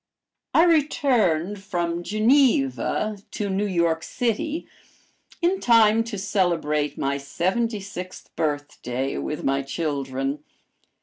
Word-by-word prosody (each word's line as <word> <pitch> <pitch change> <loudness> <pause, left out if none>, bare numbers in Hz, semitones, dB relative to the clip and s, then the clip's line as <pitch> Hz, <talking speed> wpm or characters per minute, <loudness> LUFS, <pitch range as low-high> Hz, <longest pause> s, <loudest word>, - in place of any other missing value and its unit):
I 325 - +7
returned 230 - +2
from 175 -3 -2
Geneva 215 - +2
to 205 -1 -3
New 200 +2 0
York 170 -3 +1
city 250 - -2 0.8
in 370 +3 +2
time 225 - +5
to 225 -3 -5
celebrate 170 -7 0
my 140 +1 -1
seventy 195 +10 -1
sixth 185 -1 -8
birthday 145 -4 -2
with 150 - -4
my 135 0 +1
children. 140 -1 -3
185 Hz, 105 wpm, -24 LUFS, 150-225 Hz, 0.8 s, I